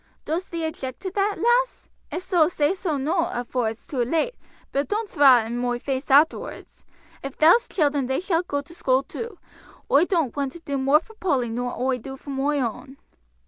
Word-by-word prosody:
Dost 340 +4 -2
thee 335 -1 -3
object 265 -5 -5
to 375 -1 -4
that, 400 +1 0
lass? 485 +2 +1 0.2
if 355 - -4
so, 355 -5 +3
say 305 -1 +1
so 360 -6 -2
noo 330 +6 +1
afore 245 -1 -1
it's 225 +1 -9
too 265 -4 -2
late, 325 - 0 0.4
but 280 +1 0
doon't 420 0 -2
thraw 265 -5 +6
it - - -7
in 235 +2 -3
moi 245 0 0
face 265 +2 -3
arterwards. 290 +4 +2 0.4
Ef 275 0 -6
thou'st 345 +10 +5
children 290 -6 +1
they 265 - 0
shalt 350 -1 0
go 285 0 -1
to 285 +4 -16
school 265 -5 +1
too. 455 - -7 0.5
Oi 290 +5 +6
don't 330 - 0
want 280 -2 -2
to 340 - -10
do 280 -4 -3
more 275 +4 +4
for 445 - -17
Polly 275 - -1
nor 245 +1 -3
oi'd 255 -1 0
do 270 +2 -8
for 280 - -9
moi 275 +2 0
own." 265 +2 -4
285 Hz, 205 wpm, -24 LUFS, 265-350 Hz, 0.5 s, thraw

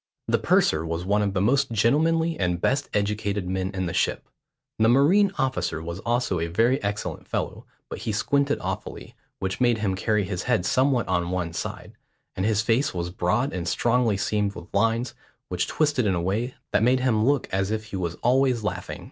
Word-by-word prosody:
The - - +2
purser 80 0 +2
was 85 +2 -3
one 105 +2 +2
of 100 -1 -1
the 95 - +1
most 135 +6 +2
gentlemanly 160 +9 +2
and 90 -2 0
best 135 +9 0
educated 100 -2 -1
men 95 0 -1
in 95 -2 -3
the 85 - -3
ship. - - 0 0.5
The 110 +1 +4
marine 175 +11 +4
officer 130 -11 -1
was 85 +2 -6
also 120 -5 0
a 85 - -1
very 115 +10 +2
excellent 105 +1 -4
fellow, - - -4 0.2
but - - -7
he 110 - -3
squinted 140 +7 +1
awfully, - - -5 0.2
which 95 +5 -3
made 120 -2 +3
him 105 -3 -1
carry 105 +2 0
his 90 -1 -3
head 115 -8 0
somewhat 130 -2 +2
on 85 -2 0
one 90 -2 -2
side; - - -5 0.4
and 95 +2 0
his 105 -1 +2
face 115 0 +1
was 90 0 -3
broad 110 +9 0
and 90 -1 -3
strongly 120 0 +2
seamed 105 0 -1
with 85 - -11
lines, 115 +1 +1 0.4
which - - -1
twisted 145 -7 +1
in 95 - +2
a - - 0
way 110 +8 -2 0.2
that 105 - +2
made 125 +3 +3
him 115 -4 +2
look 140 +1 +2
as 95 +1 0
if 110 0 -2
he - - -4
was 90 -2 -2
always 125 -1 +3
laughing. 105 - -4
105 Hz, 200 wpm, -25 LUFS, 95-125 Hz, 0.5 s, The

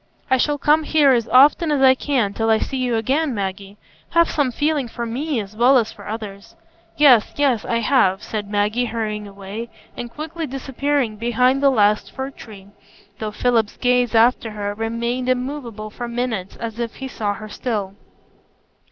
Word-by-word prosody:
"I 260 - +5
shall 290 +3 +1
come 300 +2 +3
here 300 -3 +3
as 235 -3 +2
often 295 +5 +5
as 290 - +1
I 260 -1 +8
can 255 -7 -1
till 225 +1 -1
I 220 - +5
see 270 - -3
you 250 -2 0
again, 265 +5 0
Maggie. 195 0 -5 0.3
Have 335 0 +3
some 285 -4 +1
feeling 290 0 0
for 235 +1 -5
me 265 +4 -2
as 205 0 -7
well 250 +4 +5
as 225 -2 0
for 205 - -13
others." 210 -2 -7 0.4
"Yes, 260 -7 +5
yes, 265 -7 +1
I 230 0 0
have," 200 -6 +2
said 210 -2 -5
Maggie, 210 +4 0
hurrying 215 -3 -4
away, 200 +4 -8 0.3
and 240 - -6
quickly 315 +5 -6
disappearing 270 -2 -2
behind 250 +4 +2
the 280 - +5
last 210 -4 +2
fir 265 0 -5
tree; 200 -6 -13 0.5
though 215 - -3
Philip's 225 -1 0
gaze 245 -2 +1
after 230 0 +3
her 205 -1 -4
remained 235 +3 -2
immovable 250 -5 -3
for 240 +2 -6
minutes 235 -5 -3
as 230 -1 -6
if 235 -1 -3
he 265 - -6
saw 210 -5 -3
her 215 +1 -9
still. 205 -3 -3
235 Hz, 180 wpm, -21 LUFS, 215-265 Hz, 0.5 s, I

